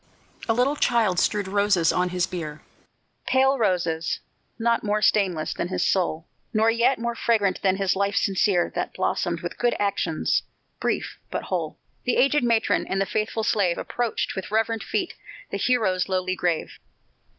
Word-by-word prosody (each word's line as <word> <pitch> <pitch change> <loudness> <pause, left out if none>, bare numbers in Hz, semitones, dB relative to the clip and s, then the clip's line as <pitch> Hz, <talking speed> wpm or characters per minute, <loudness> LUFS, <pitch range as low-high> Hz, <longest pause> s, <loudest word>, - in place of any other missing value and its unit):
A - - +5
little 260 +5 +2
child 225 -10 +2
strewed 205 -2 +1
roses 200 -4 +2
on 180 0 +1
his 180 0 0
bier 160 -5 -6 0.6
Pale 265 +1 +3
roses, 175 -6 0 0.4
not 235 0 +1
more 210 0 +1
stainless 190 -7 +2
than 170 - -3
his 185 - 0
soul, 170 -4 0 0.3
Nor 220 +1 +4
yet 235 +3 +2
more 235 +1 -2
fragrant 215 -5 +1
than 190 -2 +2
his 195 -1 +1
life 200 +1 0
sincere, 195 -2 +2
That - - -3
blossomed - - -1
with - - -6
good 240 -1 +2
actions 180 -5 0 0.4
brief, - - -2
but - - -3
whole; - - -3 0.3
The 250 - +1
aged 275 +1 +3
matron 230 -2 +2
and 195 - -1
the 195 - +2
faithful 215 +2 -2
slave 195 -5 +1
Approached 240 -2 -2
with 190 - -5
reverent 225 +1 0
feet 370 -3 -2 0.4
the - - -1
hero's 205 -8 +1
lowly 185 0 0
grave. 175 -3 -2
200 Hz, 160 wpm, -24 LUFS, 185-230 Hz, 0.6 s, A